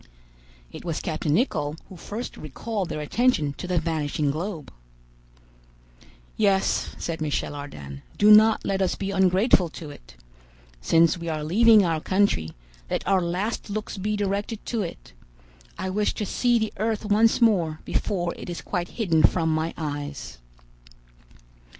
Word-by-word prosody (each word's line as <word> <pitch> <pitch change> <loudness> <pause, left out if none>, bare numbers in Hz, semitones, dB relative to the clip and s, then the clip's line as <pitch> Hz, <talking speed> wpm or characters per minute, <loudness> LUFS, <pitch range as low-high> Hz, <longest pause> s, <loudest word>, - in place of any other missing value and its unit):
It - - -9
was 165 -3 -3
captain 155 -2 -1
Nicholl 155 - 0
who 190 - -12
first 210 +7 -6
recalled 190 - -4
their 150 - -4
attention 155 - +1
to 180 - -5
the 180 -1 0
vanishing 155 -3 0
globe. 160 - -5 1.6
"Yes," 195 -2 +1
said 165 -1 -4
Michel 150 -1 -2
Ardan, 70 - -8 0.2
"do 210 +1 +6
not 220 +1 +6
let 195 0 0
us 190 - +1
be 195 0 -3
ungrateful 190 0 +3
to 155 -1 -9
it. - - -15 0.7
Since 165 - +3
we 170 0 -4
are 155 -1 -2
leaving 215 +5 +5
our 165 -2 0
country, 190 - +1 0.4
let - - -2
our 190 -1 +3
last 185 +7 -2
looks 210 -1 -4
be 210 +2 -1
directed 205 +2 -2
to 230 -3 -2
it. 60 - -7 0.6
I 190 - -3
wish 210 +2 0
to 210 - -2
see 240 +4 +2
the 220 -1 -2
earth 220 +1 -1
once 215 +2 +3
more 180 -10 +2
before 175 -4 -1
it - - -8
is 175 - -6
quite 175 -2 -2
hidden 170 -9 +2
from 160 0 +3
my 160 +1 -1
eyes." 145 - -5
180 Hz, 150 wpm, -25 LUFS, 155-210 Hz, 1.6 s, do